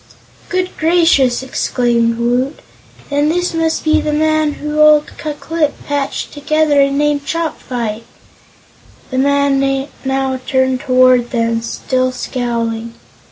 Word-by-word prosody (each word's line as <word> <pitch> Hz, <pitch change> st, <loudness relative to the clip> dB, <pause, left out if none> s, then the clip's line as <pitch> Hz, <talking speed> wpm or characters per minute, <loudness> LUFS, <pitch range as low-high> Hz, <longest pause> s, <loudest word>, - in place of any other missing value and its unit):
"Good 365 Hz, 0 st, -2 dB
gracious!" 315 Hz, -7 st, +3 dB
exclaimed 235 Hz, -3 st, 0 dB
Woot. 245 Hz, +4 st, 0 dB, 0.5 s
"Then 290 Hz, +1 st, +2 dB
this 355 Hz, +2 st, 0 dB
must 325 Hz, -1 st, 0 dB
be 310 Hz, 0 st, +2 dB
the 305 Hz, -, -2 dB
man 310 Hz, 0 st, +1 dB
whom 300 Hz, +1 st, -4 dB
old 305 Hz, 0 st, +4 dB
Ku 305 Hz, -1 st, -3 dB
Klip 315 Hz, -1 st, -1 dB
patched 285 Hz, -1 st, -3 dB
together 300 Hz, 0 st, +2 dB
and 275 Hz, 0 st, +1 dB
named 295 Hz, -1 st, +1 dB
Chopfyt." 250 Hz, -9 st, -3 dB, 1.1 s
The 260 Hz, -, -1 dB
man 275 Hz, 0 st, +1 dB, 0.2 s
now 265 Hz, -1 st, -1 dB
turned 260 Hz, -1 st, +1 dB
toward 255 Hz, -3 st, +3 dB
them, 230 Hz, -2 st, 0 dB
still 255 Hz, +2 st, -1 dB
scowling. 235 Hz, -2 st, -3 dB
275 Hz, 120 wpm, -16 LUFS, 250-305 Hz, 1.1 s, old